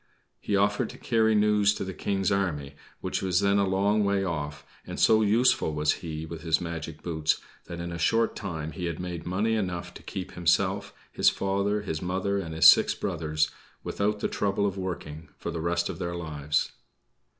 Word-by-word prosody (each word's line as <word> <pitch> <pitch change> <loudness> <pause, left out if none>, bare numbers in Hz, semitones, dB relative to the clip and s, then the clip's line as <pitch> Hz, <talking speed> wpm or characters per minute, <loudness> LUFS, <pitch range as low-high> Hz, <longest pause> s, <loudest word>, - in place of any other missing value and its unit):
He 100 - -1
offered 100 +3 +2
to - - -10
carry 110 -2 +2
news 105 -1 +4
to - - -3
the 95 - -5
King's 95 -1 -1
army, 80 -8 -1 0.3
which - - -2
was 95 -1 +2
then 100 0 +3
a 100 - +2
long 100 +3 +2
way 100 -1 +1
off; 75 -5 -4 0.2
and - - -7
so 110 0 +5
useful 105 -7 +3
was 75 0 +2
he 80 -2 -5
with 80 0 -8
his 80 -2 +2
magic 80 -2 -6
boots, 80 -3 0 0.3
that 85 -1 -7
in 85 0 -4
a 85 - -5
short 115 +7 +2
time 80 -6 -4
he 90 0 -5
had 85 -2 -3
made 90 -2 -5
money 105 +5 +1
enough 90 -5 -2
to - - -11
keep 95 - -6
himself, 95 +3 +1 0.2
his - - +4
father, 100 +2 -1
his 80 -6 -3
mother 95 +2 -1
and 80 -4 -5
his 80 - +3
six - - +8
brothers 80 -2 -1 0.3
without 105 +1 -1
the - - +1
trouble 100 0 0
of 100 -2 -1
working 80 -5 -5
for - - -4
the 80 - -4
rest 85 +1 0
of - - -6
their 85 -1 -3
lives. 75 -3 -1
90 Hz, 195 wpm, -27 LUFS, 80-100 Hz, 0.3 s, six